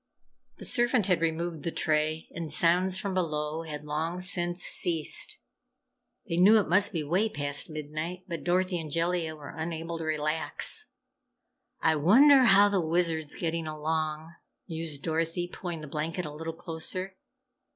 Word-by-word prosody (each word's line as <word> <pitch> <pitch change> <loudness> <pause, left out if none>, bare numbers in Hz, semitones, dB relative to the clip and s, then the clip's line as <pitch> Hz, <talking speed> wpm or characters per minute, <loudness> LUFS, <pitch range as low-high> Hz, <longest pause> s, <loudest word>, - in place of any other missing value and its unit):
The - - -4
servant 240 -3 +4
had 180 -4 +1
removed 165 0 -2
the 170 - -2
tray, 155 0 -1
and 165 -2 -5
sounds 180 +4 +3
from 195 0 -3
below 155 -3 -2
had 150 -2 -7
long 160 +4 -3
since 175 -1 +2
ceased. 165 -4 0 0.9
They 165 - -2
knew 200 +5 +7
it 205 - -1
must 195 +6 +4
be 165 -5 -2
way 185 +9 +1
past 145 -3 -1
midnight, 155 +4 -5
but 170 -4 -5
Dorothy 180 0 +1
and 160 -2 -6
Jellia 165 0 -1
were 150 -2 -10
unable 165 0 -4
to - - -4
relax. 155 - -1 0.9
"I 160 -1 +3
wonder 260 - +6
how 205 -2 +7
the 200 -2 +1
Wizard's 160 -2 0
getting 165 -1 -3
along!" 155 +1 -3 0.3
mused 160 -3 -5
Dorothy, 165 +2 -1
pulling 175 -4 -5
the 155 - -8
blanket 160 +4 -3
a 150 - -7
little 160 +2 -5
closer. 175 +3 -5
165 Hz, 150 wpm, -28 LUFS, 155-180 Hz, 0.9 s, knew